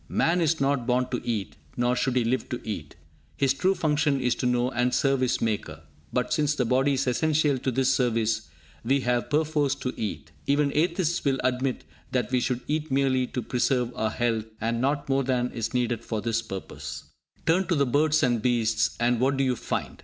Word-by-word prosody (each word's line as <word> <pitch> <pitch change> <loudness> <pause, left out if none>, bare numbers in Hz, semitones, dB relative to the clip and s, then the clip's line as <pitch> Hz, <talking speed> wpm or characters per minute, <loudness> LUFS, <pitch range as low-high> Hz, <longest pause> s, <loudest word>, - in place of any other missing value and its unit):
Man 175 +2 +2
is 160 0 +2
not 135 -3 +1
born 125 0 +2
to 125 - -1
eat, 110 -5 -3 0.2
nor 120 +1 +2
should 130 0 0
he 125 - +3
live 125 +3 -1
to 125 -3 -3
eat. 80 -9 -5 0.4
His 135 -1 +3
true 185 +7 +1
function 150 -3 +1
is 125 -1 +1
to 125 - 0
know 125 +1 +1
and 125 0 +1
serve 135 -1 +2
his 130 0 +1
Maker; 110 -2 -2 0.3
but, - - 0
since 150 0 +1
the 125 - 0
body 130 +4 +2
is 135 +1 0
essential 145 +1 +2
to 130 - -1
this 130 +1 +2
service, 115 - 0 0.3
we 135 +4 +2
have 120 -1 0
perforce 150 -2 +1
to 130 -2 -4
eat. 105 - -5 0.2
Even 145 0 +2
atheists 170 +1 +1
will 135 -2 +2
admit 130 +1 0 0.3
that 125 -2 0
we 125 - +3
should 125 0 -1
eat 155 +1 -1
merely 130 -2 +2
to 125 - -4
preserve 125 0 0
our 110 - 0
health, 115 -1 -1
and 115 +1 -1
not 140 +2 0
more 135 0 +2
than 125 -1 0
is 115 -1 -3
needed 120 -2 -1
for 110 -2 -3
this 115 +1 0
purpose. 95 -4 -7 0.4
Turn 180 +4 +2
to 175 - +2
the 140 -1 +3
birds 150 +4 +2
and 120 -4 +2
beasts, 115 -2 +1
and 120 0 +2
what 135 +2 +2
do 135 - +2
you 130 -1 +1
find? - - -4
130 Hz, 205 wpm, -26 LUFS, 120-140 Hz, 0.4 s, he